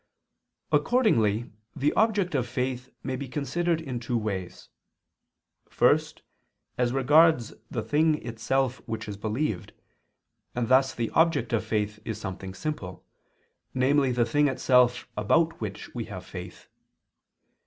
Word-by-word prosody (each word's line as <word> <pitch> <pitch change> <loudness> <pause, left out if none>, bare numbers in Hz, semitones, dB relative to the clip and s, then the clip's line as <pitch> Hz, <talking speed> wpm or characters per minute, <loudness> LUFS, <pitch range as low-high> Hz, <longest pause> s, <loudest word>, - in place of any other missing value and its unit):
Accordingly 120 - +2 0.2
the 145 0 +1
object 210 -5 +2
of 130 -4 0
faith 125 +1 -3
may 130 -1 -2
be 140 +1 -5
considered 155 +5 -1
in 135 -7 -4
two 120 0 -1
ways. 95 -5 -4 1.0
First, - - +2 0.5
as 125 -1 +1
regards 135 -1 +4 0.2
the 115 - -3
thing 150 +7 +3
itself 125 +3 -1
which 110 -2 -4
is 105 - -5
believed, 110 0 -3 0.8
and 120 -2 -1
thus 130 +1 +4
the 115 -1 -2
object 165 -6 +2
of 115 - +1
faith 105 -1 -2
is 110 -2 -4
something 95 -1 -6
simple, 95 -6 -5 0.7
namely 135 +1 +3
the 120 -1 +2
thing 145 +5 +2
itself 125 -2 +3
about 160 - +1
which 105 -3 -6
we - - -4
have - - -8
faith. - - -9
125 Hz, 130 wpm, -27 LUFS, 110-145 Hz, 1.0 s, regards